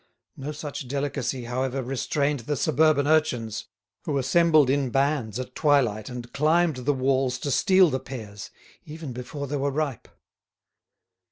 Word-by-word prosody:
No 140 +2 -5
such 145 -3 -6
delicacy, 135 -2 -2
however, 130 +2 -2
restrained 140 +3 -1
the 145 +6 -3
suburban 150 +1 +3
urchins, 125 -8 0 0.4
who 145 - -1
assembled 155 +2 +4
in 135 0 +1
bands 135 -4 0
at 130 0 -6
twilight 125 -9 +2
and 120 -1 -8
climbed 155 +1 +2
the 130 +3 0
walls 130 -1 +1
to 140 +2 -3
steal 185 - +4
the 130 - -1
pears, 105 -7 -8 0.3
even 155 -3 -8
before 135 +4 -6
they 145 +1 -3
were 140 +1 0
ripe. 140 -2 -3
135 Hz, 145 wpm, -25 LUFS, 125-150 Hz, 0.4 s, assembled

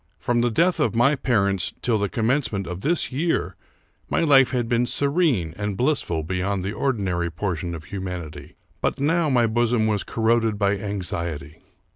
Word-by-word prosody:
From 120 -1 0
the 120 - +2
death 170 +9 +2
of 150 - +1
my 120 +5 +4
parents 100 -9 0
till 115 -3 +2
the 100 -1 -1
commencement 115 -4 0
of 90 +2 -6
this 170 +3 0
year 165 +6 -1 0.5
my - - +1
life 140 -5 +5
had 120 -2 -1
been 120 0 +1
serene 140 - +1
and 105 -2 -3
blissful 125 - 0
beyond 90 +3 -2
the 100 - -2
ordinary 95 -11 -1
portion 85 0 -3
of 80 - -8
humanity; 90 -5 -7 0.3
but - - -1
now 160 +3 +2
my 125 -3 +3
bosom 115 0 +1
was 105 -2 0
corroded 115 -1 +1
by 100 0 +2
anxiety. 85 -7 -4
110 Hz, 165 wpm, -23 LUFS, 95-130 Hz, 0.5 s, life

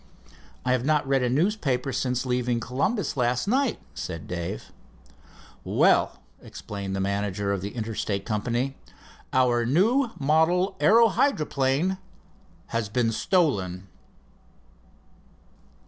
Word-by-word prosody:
"I 125 - +2
have 125 -1 +1
not 150 0 +1
read 135 -1 +2
a 125 - +1
newspaper 140 - 0
since 125 0 -1
leaving 125 -1 0
Columbus 140 - -1
last 125 +1 0
night," 260 +2 +1
said 80 -3 -6
Dave. 85 -1 -5 0.9
"Well," - - +2 0.2
explained 100 -1 -6
the - - -2
manager 100 0 -1
of 100 - -3
the 100 +4 -6
Interstate 110 -3 -3
Company, 120 +5 -1 0.6
"our 125 -2 +3
new 220 - +3
model 160 +6 +2
aero 230 +2 +6
hydroplane 155 - +1 0.7
his 115 -3 -1
been 115 +1 +1
stolen." 100 - 0
125 Hz, 110 wpm, -26 LUFS, 105-155 Hz, 0.9 s, aero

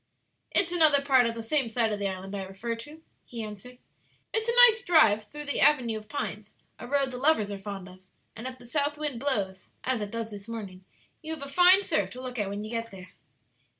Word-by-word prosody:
"It's 345 -3 +2
another 310 -5 +4
part 260 -4 +4
of 230 - -3
the 230 - -6
same 260 +1 0
side 225 -1 +1
of 205 - -3
the 200 - 0
island 190 +1 -6
I 195 - -3
refer 195 +5 -5
to," 295 +8 -11 0.2
he 230 -2 -7
answered. 215 +4 -10 0.6
"It's 445 +1 0
a 470 - +1
nice 460 -1 +1
drive 225 - +4
through 295 +6 -9
the 285 - -2
avenue 260 -6 +4
of 215 0 -8
pines 215 -5 -5 0.2
a - - -8
road 275 0 +1
the 250 - -6
lovers 255 -8 +2
are 200 - -5
fond 195 -2 -7
of 185 0 -14 0.4
and 225 +3 -6
if 260 0 -8
the 245 - -15
south 290 +3 -1
wind 295 -5 -3
blows, 200 -9 -2
as 255 -3 0
it 205 - -4
does 230 0 -5
this 200 0 -10
morning, 200 -5 -8 0.4
you 320 0 -5
have 280 -3 -7
a - - -8
fine 360 +6 +6
surf 200 - 0
to 255 - -8
look 250 -2 -5
at 205 -2 -1
when 200 +1 -5
you 215 - -7
get 230 0 -3
there." 185 -3 -12
230 Hz, 235 wpm, -28 LUFS, 205-285 Hz, 0.6 s, fine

